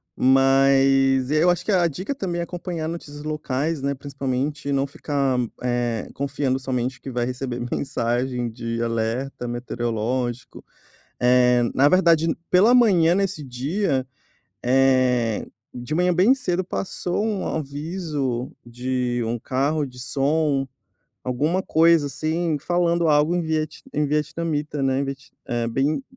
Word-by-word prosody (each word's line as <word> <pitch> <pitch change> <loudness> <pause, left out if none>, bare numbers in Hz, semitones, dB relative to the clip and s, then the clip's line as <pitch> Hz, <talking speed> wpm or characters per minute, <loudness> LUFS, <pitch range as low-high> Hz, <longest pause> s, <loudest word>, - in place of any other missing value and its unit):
mas 135 0 +4
eu 155 +4 +3
acho 175 - -2
que 215 - -1
a 175 -3 +4
dica 185 - -4
também 175 -7 -3
é - - -1
acompanhar 170 -2 -5
notícias 145 -3 -7
locais, 150 0 -2
né, 140 0 0
principalmente 140 +1 -3
e - - 0
não 135 0 +1
ficar, 140 -2 -1 0.2
eh, 120 -2 -1
confiando 140 -1 -1
somente 130 -1 -2
que 135 - -7
vai 120 0 -1
receber 125 -1 -4
mensagem 125 -2 -1
de 115 0 -4
alerta 115 +3 -2
meteorológico, 120 0 -3 0.6
eh, 125 0 +4
na 140 +2 +4
verdade 165 -2 +4 0.2
pela 210 +7 +5
manhã 180 -9 +5
nesse 190 -6 -1
dia, 135 +2 -1 0.6
eh, 125 -3 +2 0.3
de 125 +5 -5
manhã 180 +1 +2
bem 195 +10 +5
cedo 185 -8 -1
passou 185 +2 -2
um 210 -4 -2
aviso 145 -4 -3
de 125 0 -2
um 115 +1 -2
carro 140 +5 0
de 125 -1 -12
som, 140 +1 0 0.6
alguma 150 +9 0
coisa 165 -3 +4
assim, 155 +3 -1
falando 170 +1 +1
algo 150 +3 +3
em - - +1
viet 155 -1 -2
em 150 0 +1
vietnamita, 150 0 -2
né, 135 0 +1
em 140 - 0
viet 135 0 -7 0.2
é 120 -1 -1
bem 140 - 0
140 Hz, 140 wpm, -23 LUFS, 125-165 Hz, 0.6 s, pela